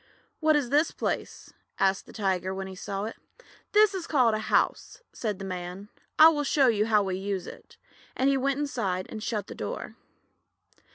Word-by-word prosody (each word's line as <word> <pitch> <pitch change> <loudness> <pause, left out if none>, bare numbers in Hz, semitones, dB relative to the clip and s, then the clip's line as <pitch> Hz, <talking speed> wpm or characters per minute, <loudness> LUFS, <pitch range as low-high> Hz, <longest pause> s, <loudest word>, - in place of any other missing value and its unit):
"What 310 -1 +4
is 275 -4 0
this 300 +3 +4
place?" - - -4 0.2
asked 195 0 +1
the - - -12
Tiger, 190 -3 -1
when 195 0 -4
he 190 - -8
saw 195 +1 -4
it. 225 - -6 0.5
"This 420 -1 +5
is 370 -3 -4
called 250 -7 +3
a 215 - 0
house," - - 0
said 210 -4 -3
the 195 - -7
Man. 185 +2 -6 0.3
"I 315 +1 +10
will 295 -2 0
show 280 -1 +3
you 220 -3 +2
how 210 -2 +4
we 190 -1 -2
use 195 -1 -3
it," - - -12 0.4
and 260 - +2
he 275 - +4
went 275 +1 0
inside 200 -11 -2
and 215 - -6
shut 210 -3 -2
the - - -9
door. - - -5
215 Hz, 190 wpm, -27 LUFS, 195-280 Hz, 0.5 s, I